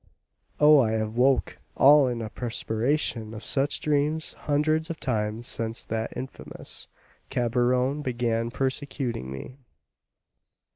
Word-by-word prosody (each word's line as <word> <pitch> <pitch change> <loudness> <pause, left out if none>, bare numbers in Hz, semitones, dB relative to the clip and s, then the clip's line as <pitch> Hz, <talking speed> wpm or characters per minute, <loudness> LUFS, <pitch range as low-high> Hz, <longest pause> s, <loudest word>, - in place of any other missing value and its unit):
Oh, 150 0 +7
I 110 -4 +2
have 110 0 -2
woke 130 +2 +2 0.2
all 140 0 +7
in 120 -2 -2
a 110 - -6
perspiration 115 0 -1
from 110 -1 -7
such 140 +5 +1
dreams 150 +1 0
hundreds 155 +2 0
of 165 - -5
times 110 -2 -2
since 115 -1 -5
that 110 0 -3
infamous 130 +2 -5 0.4
Cabrion 125 +2 +1
began 120 -3 -1
persecuting 130 - -3
me." 65 - -8
125 Hz, 115 wpm, -26 LUFS, 115-145 Hz, 0.4 s, Oh